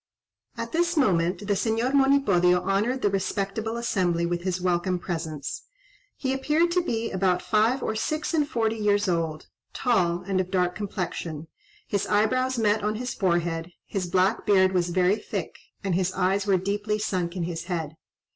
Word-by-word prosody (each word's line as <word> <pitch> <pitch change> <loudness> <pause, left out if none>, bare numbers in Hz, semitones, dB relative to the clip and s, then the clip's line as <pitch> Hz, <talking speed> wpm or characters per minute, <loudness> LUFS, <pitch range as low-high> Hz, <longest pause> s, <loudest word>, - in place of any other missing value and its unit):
At - - -4
this 345 +1 +1
moment 180 - +2
the 205 - +1
Señor 225 +5 0
Monipodio 200 -11 +4
honoured 215 +7 0
the 205 - +4
respectable 200 +3 -2
assembly 180 -7 0
with 175 0 -2
his 185 0 -2
welcome 180 0 0
presence. 160 -5 -5 0.5
He 265 -1 -1
appeared 305 +6 +1
to 360 +1 +3
be 230 -9 -2
about 185 -1 +1
five 225 +4 +2
or - - -1
six 310 +8 -2
and 300 -2 +1
forty 225 -4 0
years 205 -1 +2
old, 165 -3 -1 0.3
tall, 180 -8 +1
and 190 -1 +1
of 185 - -6
dark 180 -1 +1
complexion; 170 -6 -4 0.4
his 200 -2 -1
eyebrows 255 +5 +2
met 215 -2 +2
on 210 +1 0
his 245 +2 -3
forehead, 170 -2 -1
his 190 -3 -3
black 185 +4 +2
beard 190 -3 +4
was 180 -2 +1
very 185 +3 +2
thick, - - -5 0.2
and 195 -2 0
his 185 +1 +1
eyes 195 +2 +1
were 195 -2 +4
deeply 205 +3 -1
sunk 185 -4 -2
in 180 - -2
his 165 0 -4
head. 165 -4 -3
195 Hz, 170 wpm, -26 LUFS, 180-225 Hz, 0.5 s, Monipodio